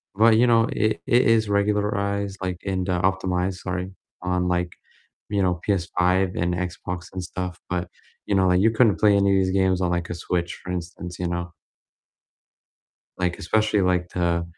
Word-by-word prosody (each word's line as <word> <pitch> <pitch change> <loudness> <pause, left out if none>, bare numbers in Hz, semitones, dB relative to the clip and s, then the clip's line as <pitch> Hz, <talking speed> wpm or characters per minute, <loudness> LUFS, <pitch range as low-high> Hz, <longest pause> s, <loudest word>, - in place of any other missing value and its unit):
but, 110 +2 +5
you 125 - +4
know, 115 -1 +5
it 110 0 0
it 120 +1 +4
is 110 -1 +3
regularized, 100 -1 0
like 90 -2 -2
and, 95 -1 -2
uh, 90 -1 +1
optimized, 95 0 0
sorry, 90 +1 -4 0.3
on, 90 0 0
like, 90 -1 -1 0.6
you 100 -1 0
know, 90 -1 +2
PS5 90 -1 +1
and 90 +1 0
Xbox 90 0 -5
and 95 - -4
stuff, 90 0 -5
but, 90 0 -2 0.4
you 100 - 0
know, 95 -1 +3
like 90 0 +3
you 110 +2 +4
couldn't 110 -6 +3
play 105 +2 +5
any 100 -1 +3
of 95 - +3
these 95 - -1
games 95 -1 +2
on 90 -1 +1
like 85 0 -2
a 90 - -3
Switch, 85 0 -2
for 90 - -5
instance, 90 0 -6
you 90 - -1
know. 85 0 -4 1.7
Like, 90 -1 -1
especially 110 +3 +1
like 90 -1 +1
the 85 -1 0
90 Hz, 180 wpm, -24 LUFS, 90-100 Hz, 1.7 s, but